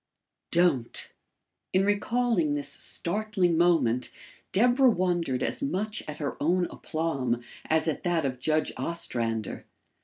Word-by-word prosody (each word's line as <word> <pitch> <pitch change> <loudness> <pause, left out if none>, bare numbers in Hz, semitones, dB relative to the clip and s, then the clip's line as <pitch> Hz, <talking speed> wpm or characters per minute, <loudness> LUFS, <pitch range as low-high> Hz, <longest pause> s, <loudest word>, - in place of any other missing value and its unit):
DON'T!" 170 -9 +1 0.6
In 190 +1 +4
recalling 205 -5 +1
this 145 -1 -2
startling 185 +4 0
moment, 155 -8 +3 0.4
Deborah 245 +5 +5
wondered 175 - 0
as - - -2
much 215 -5 -1
at 150 - -5
her 145 -2 -4
own 175 +4 +2
aplomb 135 -7 -2 0.2
as 160 +1 +2
at 160 - -1
that 170 -4 +1
of 130 -2 -2
Judge 155 +3 +1
Ostrander. 115 -10 -2
170 Hz, 120 wpm, -28 LUFS, 140-190 Hz, 0.6 s, Deborah